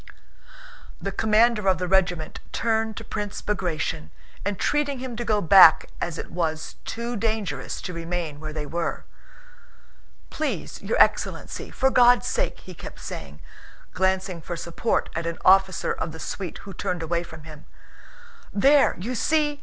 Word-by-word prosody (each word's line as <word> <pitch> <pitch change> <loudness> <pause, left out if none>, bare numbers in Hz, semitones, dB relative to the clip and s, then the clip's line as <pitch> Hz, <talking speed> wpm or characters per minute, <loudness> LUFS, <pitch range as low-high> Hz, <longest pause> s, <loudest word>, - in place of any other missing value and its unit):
The 195 - -3
commander 215 +1 +3
of 185 - +3
the 180 +1 -2
regiment 180 -4 +1
turned 225 -1 0
to 225 - -5
Prince 205 -2 -4
Bagratión, 175 - -2 0.3
entreating 280 +8 0
him 250 -1 -6
to 240 - -3
go 215 -3 +1
back 180 -2 +7
as 170 -2 -2
it - - -7
was 160 -2 -3
too 235 +1 -4
dangerous 205 - -2
to 180 - -5
remain 165 -3 -4
where 155 0 -6
they 155 -1 -4
were. 170 +3 -3 1.3
"Please, 310 -1 -3
your - - -1
excellency, - - +1
for 265 0 +1
God's 245 -1 +6
sake!" - - -1
he 185 - -10
kept - - -10
saying, 70 +1 -8 0.5
glancing 190 -1 0
for 175 - -5
support 170 +7 -1
at 170 0 -2
an 170 - -3
officer 190 -1 +4
of 160 - -4
the 160 - -9
suite 180 +2 -5
who 195 - -8
turned 180 -2 -3
away 170 +1 0
from 160 -3 -11
him. 155 -1 -12 0.9
"There, 275 +7 +4
you 225 +8 -4
see!" 295 +3 +1
190 Hz, 155 wpm, -25 LUFS, 165-225 Hz, 1.3 s, back